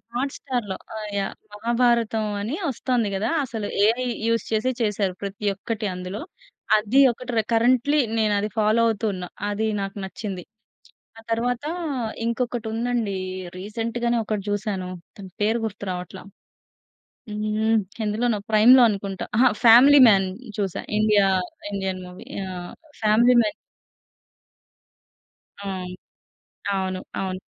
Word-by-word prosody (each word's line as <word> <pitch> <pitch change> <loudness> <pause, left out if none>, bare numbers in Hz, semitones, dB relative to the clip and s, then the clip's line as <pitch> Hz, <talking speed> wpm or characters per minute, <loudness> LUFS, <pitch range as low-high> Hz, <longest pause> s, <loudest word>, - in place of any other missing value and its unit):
Hot 270 +3 -1
స్టార్‌లో. 240 -8 -3 0.2
ఆ 220 - -4 0.2
yeah! 195 -1 -2 0.2
Mahabharatam 235 0 +1 0.2
అని 225 +8 -2
ఒస్తుంది 245 -3 0
గదా. 210 +4 -1 0.2
అసలు 225 -4 -4 0.2
ఏఐ 240 +3 +2 0.2
యూజ్ 230 0 +1
చేసి 225 +4 +1
చేసారు. 205 -3 0
ప్రతి 200 +1 -5
ఒక్కటి 215 +2 -4
అందులో. 185 +3 -6 0.6
అది 215 +6 +2
ఒకటి 250 +2 -7
రె 220 - +3
కరెంట్‌లీ 250 +5 +3 0.2
నేను 215 -2 +2
అది 210 +1 -2
ఫాలో 215 +1 +3
అవుతు 225 0 -1
ఉన్న. 180 -1 -6 0.3
అది 215 +2 -1
నాకు 195 +2 -5
నచ్చింది. 190 -1 -6 0.8
ఆ - - -10
తరువాత 240 +3 0 0.6
ఇంకొకటి 235 -1 -2
ఉందండి. 230 -3 -1 0.4
రీసెంట్‌గానే 230 +4 -2
ఒకటి 210 -2 -2
చూసాను. 200 -3 -2 0.3
దాని 190 -2 -9
పేరు 220 +3 +2
గుర్తు 205 -2 -5
రావట్ల. 180 +1 -6 1.1
హ్మ్. 215 +1 +1 0.2
ఎందులోనో 220 +1 0
ప్రైమ్‌లో 240 +4 +7
అనుకుంటా. 195 -2 -4
అహ! 255 0 +6
'ఫ్యామిలీ 255 +5 +8
మాన్' 195 -2 +3 0.3
చూసా. 195 -3 -2 0.2
ఇండియా 210 -2 +4 0.5
ఇండియన్ 190 -2 -2
మూవీ 180 0 -12 0.3
ఆహ్ 175 -1 -7 0.3
'ఫ్యామిలీ 225 +3 +5
మాన్.' 210 - -1 2.1
అవును. 185 -2 -5 0.8
అవును. 185 -1 -2 0.2
అవును. 185 -1 -3
215 Hz, 120 wpm, -24 LUFS, 195-235 Hz, 2.1 s, ఫ్యామిలీ